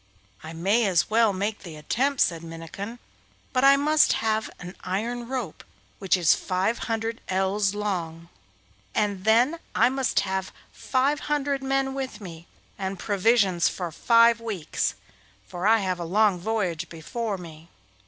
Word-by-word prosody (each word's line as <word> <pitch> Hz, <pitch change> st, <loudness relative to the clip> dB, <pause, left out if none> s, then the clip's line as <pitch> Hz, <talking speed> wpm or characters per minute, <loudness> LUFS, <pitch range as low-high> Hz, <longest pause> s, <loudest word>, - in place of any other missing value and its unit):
'I 160 Hz, +1 st, -8 dB
may 200 Hz, +7 st, +2 dB
as 185 Hz, +2 st, +1 dB
well 225 Hz, -1 st, +4 dB
make 200 Hz, +2 st, -2 dB
the 170 Hz, -5 st, -10 dB
attempt,' 255 Hz, -, 0 dB
said 165 Hz, -2 st, +2 dB
Minnikin, 165 Hz, +7 st, -8 dB, 0.6 s
'but 255 Hz, 0 st, +2 dB
I 275 Hz, 0 st, +7 dB
must 300 Hz, +2 st, +4 dB
have 220 Hz, 0 st, -1 dB
an 180 Hz, +1 st, -9 dB
iron 230 Hz, +6 st, -3 dB
rope 250 Hz, -10 st, -5 dB, 0.4 s
which 195 Hz, -1 st, +2 dB
is 170 Hz, -3 st, +5 dB
five 190 Hz, +5 st, -1 dB
hundred 225 Hz, 0 st, -2 dB
ells 195 Hz, +2 st, +1 dB
long, 170 Hz, -5 st, -3 dB, 0.7 s
and 205 Hz, -2 st, -1 dB
then 245 Hz, +9 st, +3 dB, 0.2 s
I -, -, +5 dB
must 265 Hz, -1 st, +1 dB
have 190 Hz, -1 st, -3 dB, 0.2 s
five 275 Hz, +3 st, 0 dB
hundred 285 Hz, -2 st, 0 dB
men 270 Hz, 0 st, 0 dB
with 265 Hz, -5 st, -5 dB
me, 170 Hz, -4 st, -10 dB, 0.3 s
and 190 Hz, 0 st, -3 dB
provisions 200 Hz, -3 st, +2 dB
for 175 Hz, -3 st, -4 dB
five 230 Hz, +5 st, +4 dB
weeks, 200 Hz, -9 st, -2 dB, 0.5 s
for 180 Hz, +2 st, -2 dB
I 225 Hz, +1 st, +6 dB
have 185 Hz, -2 st, -2 dB
a -, -, -3 dB
long 195 Hz, +2 st, +2 dB
voyage 180 Hz, -5 st, -2 dB
before 200 Hz, +6 st, -4 dB
me. 165 Hz, -2 st, -12 dB
205 Hz, 150 wpm, -25 LUFS, 180-235 Hz, 0.7 s, I